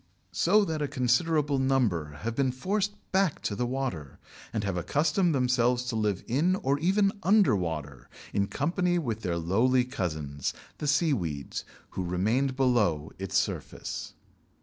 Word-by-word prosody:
So 205 +4 +4
that 160 -4 -2
a 145 - 0
considerable 140 +2 +1
number 115 - +1
have 115 +1 -2
been 135 -1 +2
forced 200 +10 -1 0.2
back 190 -4 +2
to 100 - -1
the 120 +3 -1
water, 125 - -4 0.3
and 110 -2 -2
have 100 -3 -1
accustomed 150 - +1
themselves 125 -1 +2
to 125 -2 -3
live 105 -4 0
in 155 +10 +2
or 145 -8 0
even 195 +4 +3
under 195 - +4
water 75 -7 -4 0.2
in 100 0 +1
company 175 - 0
with 115 -9 -2
their 85 -4 -1
lowly 115 +10 +2
cousins, 75 - -3 0.2
the 150 - -3
seaweeds, 105 - 0 0.3
who 95 - -3
remained 110 +10 0
below 105 - +1
its 95 0 -1
surface. - - -3
125 Hz, 150 wpm, -28 LUFS, 95-150 Hz, 0.3 s, So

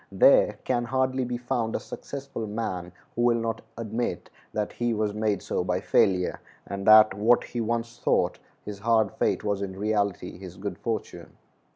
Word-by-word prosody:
There - - +5
can 120 -2 0
hardly 130 +1 0
be 120 0 -3
found 120 -2 -2
a - - 0
successful 135 -5 -6
man 95 -5 -4 0.2
who 120 - -1
will 120 -1 +4
not 115 -1 -2 0.2
admit 115 +1 -3 0.2
that 105 -1 -2
he 120 -1 -1
was 105 -1 0
made 105 -2 0
so - - -1
by - - 0
failure, 90 -2 +2 0.3
and 100 0 -5
that 110 -1 +8
what 110 +5 +3
he 120 - -4
once 115 +1 -2
thought - - +1 0.3
his 105 -1 -6
hard 110 -1 +2
fate - - 0
was 100 -1 -1
in 95 -1 -4
reality 100 -4 -1
his 90 -2 -10
good 100 +2 -5
fortune. 115 -2 -5
110 Hz, 175 wpm, -26 LUFS, 100-120 Hz, 0.3 s, that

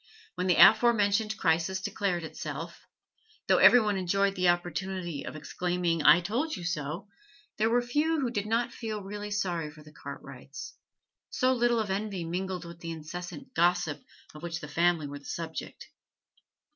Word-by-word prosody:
When 180 0 -2
the 180 - +4
afore 240 +7 +7
mentioned 215 +1 +1
crisis 170 +3 +1
declared 195 -3 -2
itself, 160 +1 -7 0.6
though - - +4
every 245 - +8
one 210 -3 0
enjoyed 195 +2 +1
the 180 -2 +2
opportunity 175 -2 -2
of - - -7
exclaiming 175 +1 -1
'I 150 +4 +7
told 245 - -1
you 180 - -7
so!' 165 +2 -3 0.5
there 220 +1 +3
were 240 +1 +2
few 300 +6 +1
who 255 -4 -1
did 205 -3 -2
not 235 +2 0
feel 215 -3 -5
really 205 +1 -6
sorry 180 -6 -1
for 150 0 -14
the 150 0 -16
Cartwrights, 140 -1 -9 0.6
so 260 0 +2
little 240 -1 +2
of 210 -3 -2
envy 195 -2 -2
mingled 180 +1 -3
with 170 0 -10
the 170 - -7
incessant 165 +1 -7
gossip 175 -2 +1 0.3
of 150 - -11
which 165 -1 -4
the 150 - -8
family 170 +1 +2
were 145 0 -7
the 140 - -20
subject. 165 -1 -6
180 Hz, 170 wpm, -29 LUFS, 165-210 Hz, 0.6 s, every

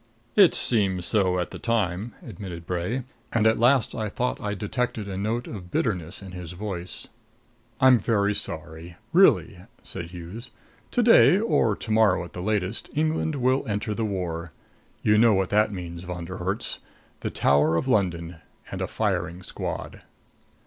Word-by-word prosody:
"It 195 -4 +7
seemed 95 -6 +3
so 95 -2 +2
at 90 - -2
the - - -8
time," 110 -1 -1
admitted 90 -5 -8
Bray; 90 +9 -2 0.3
and 110 -2 +1
at 110 0 +4
last 125 +1 +3
I 110 -1 -3
thought 125 +5 -2
I 105 0 -2
detected 110 +1 -2
a 95 - -5
note 110 +5 -2
of 90 -5 -8
bitterness 90 -3 -2
in 95 - -9
his 90 -1 -7
voice. 90 -2 -5 0.7
"I'm 130 -2 +6
very 105 -1 +1
sorry 85 -1 -5 0.2
really," 140 - +4 0.2
said 85 - -6
Hughes. 90 +8 -9 0.4
"To 245 - +1
day, 225 -5 +7
or 120 - +2
to 110 - -6
morrow 105 -5 +4
at 85 - -13
the 90 - -6
latest, 105 +1 -1
England 155 0 0
will 130 0 +2
enter 105 +1 -2
the 115 - -2
war. 90 -5 -3 0.5
You 105 0 +4
know 115 -2 +5
what 95 -1 0
that 105 +1 +3
means, 85 -3 -6
Von 90 -1 -6
der 90 +2 -7
Herts. 95 +4 -3 0.4
The - - -3
Tower 75 +4 +3
of 105 - 0
London 90 -7 0 0.3
and - - -4
a - - -1
firing 85 +3 -2
squad!" - - -5
100 Hz, 165 wpm, -25 LUFS, 90-115 Hz, 0.7 s, It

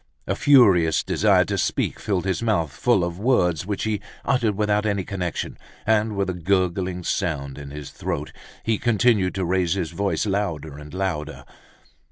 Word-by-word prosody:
A - - 0
furious 100 - +5
desire - - +3
to - - -2
speak - - -1
filled 95 -3 -1
his 95 +2 -1
mouth 100 -10 +1
full 100 - +2
of 85 +1 -3
words 90 - +2
which 100 -1 -2
he 110 -2 -1 0.2
uttered 120 -6 +1
without 105 0 +1
any 100 -2 0
connection, 90 -4 -4 0.3
and 110 0 +2
with 100 0 0
a 95 - -1
gurgling 90 0 0
sound 75 -8 -2
in 70 -1 -8
his 75 0 -8
throat. - - -4 0.3
He 110 -2 0
continued 110 -5 +2
to 95 -1 -1
raise 90 -1 +1
his 85 -4 -2
voice, 95 0 -1
louder 80 -8 -2
and 75 0 -11
louder. 85 -5 -3
95 Hz, 170 wpm, -23 LUFS, 85-105 Hz, 0.3 s, furious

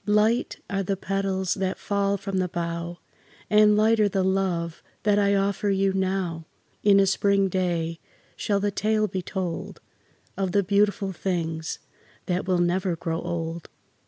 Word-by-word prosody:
Light 215 +4 +2
are 195 -1 -1
the 195 0 -1
petals 195 -1 -1
that 190 -1 -2
fall 200 0 0
from 195 0 -4
the 185 - +1
bough, 170 0 -4 0.5
And 210 0 +6
lighter 215 -1 +4
the 190 -1 0
love 185 -3 0 0.2
that 205 -1 +3
I 200 0 +3
offer 200 +1 0
you 195 0 +2
now; 185 -4 -1 0.3
In 200 -1 +5
a 195 - +5
spring 195 0 +2
day 170 -3 -1 0.4
shall 200 -1 0
the 205 0 0
tale 215 +2 +1
be 190 -1 -3
told 180 -2 -4 0.6
Of 190 -2 -2
the 200 - +3
beautiful 200 0 +1
things 165 -3 -2 0.5
that 180 0 -1
will 185 -1 +2
never 175 +1 +1
grow 165 0 -3
old. 170 -1 -4
190 Hz, 155 wpm, -25 LUFS, 175-200 Hz, 0.6 s, And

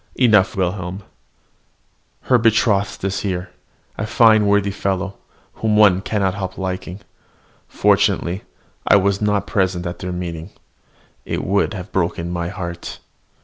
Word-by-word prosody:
enough, 110 -7 +4
Wilhelm: 95 +1 -2 1.2
her 125 -2 +3
betrothed 110 -4 +2
is 95 0 -1
here, 90 -2 -3 0.5
a 105 - -2
fine, 110 -2 +5
worthy 100 0 +2
fellow, 95 0 -3 0.4
whom 110 -1 +2
one 100 -3 +5
cannot 100 -2 0
help 95 -2 -5
liking. 95 0 -5 0.7
Fortunately 90 +4 +1 0.5
I - - +6
was 100 0 +2
not 105 -1 +1
present 95 -3 0
at 85 - -5
their 90 - -4
meeting. 85 -1 -5 0.7
It - - -3
would 100 +3 +1
have 90 -2 -7
broken 85 -1 -1
my 85 -1 -2
heart! 85 -3 -6
95 Hz, 130 wpm, -20 LUFS, 90-105 Hz, 1.2 s, I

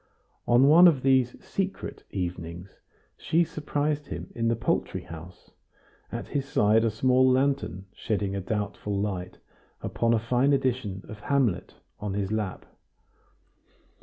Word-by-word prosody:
On 120 +3 +5
one 170 +5 +9
of 145 -7 +3
these 130 -2 +3
"secret" 195 0 -4
evenings 90 0 -5 0.4
she 170 +2 +2
surprised 150 -2 -2
him - - -7
in 115 -1 -1
the 115 - +2
poultry 115 - -1
house, 85 +2 -11 0.6
at - - -5
his 140 -2 -1
side 110 -3 +3
a 115 - +3
small 130 +4 +3
lantern 130 -7 0
shedding 100 -2 -2
a 100 - -2
doubtful 100 0 -3
light 95 -3 -3 0.5
upon 115 0 +1
a - - +3
fine 125 +5 +2
edition 120 -8 -1
of 110 - -9
"Hamlet" 120 -9 0 0.2
on 105 -2 -3
his 100 -1 -2
lap. 105 -4 -3
115 Hz, 135 wpm, -27 LUFS, 100-135 Hz, 0.6 s, one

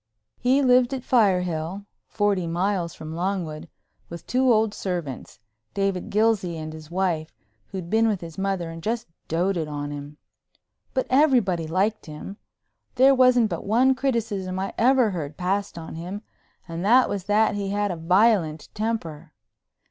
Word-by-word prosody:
He 260 +3 +3
lived 250 0 +4
at 255 - -6
Firehill—forty 190 -1 0
miles 175 0 -1
from 155 0 -8
Longwood—with 170 -2 -6
two 255 0 +2
old 220 -2 +3
servants, 175 -10 -5 0.4
David 195 -2 -1
Gilsey 205 -5 +1
and 155 0 -6
his 155 -1 -11
wife, 170 -3 -1 0.3
who'd 185 +2 -6
been 225 +4 +3
with 210 -4 0
his 165 -2 -8
mother 190 -3 -2
and 165 0 -8
just 225 +5 -2 0.2
doted 170 0 0
on 145 -1 -4
him. 145 +1 -8 0.8
But 260 - +1
everybody 240 - +3
liked 195 +6 0
him. 155 +6 -8 0.6
There 265 +2 +6
wasn't 250 -3 +4
but - - -3
one 245 +6 +3
criticism 225 -8 -2
I 195 +1 -3
ever 250 -2 +4
heard 155 -5 -5
passed 195 +1 -2
on 160 -1 -7
him 180 +6 -6 0.4
and 165 0 -5
that 245 +5 +5
was 200 -3 -4
that 215 +1 +3
he 200 -1 -3
had 205 0 0
a - - -3
violent 170 -2 +2
temper. 170 -9 -4
195 Hz, 150 wpm, -24 LUFS, 165-220 Hz, 0.8 s, There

